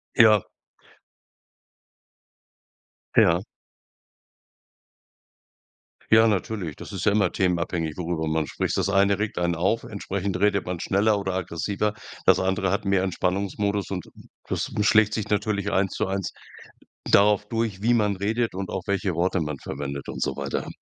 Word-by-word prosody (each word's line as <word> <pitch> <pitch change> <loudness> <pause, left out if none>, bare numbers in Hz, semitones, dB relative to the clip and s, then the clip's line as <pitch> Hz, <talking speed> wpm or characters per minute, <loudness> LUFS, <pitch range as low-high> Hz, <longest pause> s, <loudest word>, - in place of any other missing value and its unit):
Ja. 110 -5 +6 2.7
Ja. 85 +1 +5 2.7
Ja, 110 +1 +7
natürlich. 100 -6 -2
Das - - -10
ist - - -4
ja 105 - +5
immer 100 -4 +2
themenabhängig, 85 -3 -1
worüber 85 -2 -2
man 80 -1 0
spricht. - - -2
Das - - +1
eine 100 0 +3
regt 105 0 -2
einen 85 0 +1
auf, 95 +7 0
entsprechend 100 -2 -4
redet 100 0 +2
man 90 -1 -4
schneller 100 +4 +2
oder 95 -1 -3
aggressiver. 95 +4 -2 0.3
Das - - +5
andere 95 0 0
hat 100 +3 0
mehr 100 -2 +2
Entspannungsmodus 100 +2 -1
und 90 -3 -4 0.4
das - - -2
schlägt 110 0 +4
sich 105 -1 -3
natürlich 105 -1 0
eins 95 0 +1
zu - - -1
eins 95 -1 -3 0.8
darauf 105 0 +4
durch, 115 -4 -2
wie 120 +2 +3
man 105 -3 +2
redet 110 +4 -1
und 95 0 -4
auch 95 - -3
welche 100 -2 -1
Worte 90 +1 +1
man 75 -3 -3
verwendet 70 +1 -6
und - - -5
so - - -1
weiter. - - -3
100 Hz, 145 wpm, -25 LUFS, 90-105 Hz, 2.7 s, Ja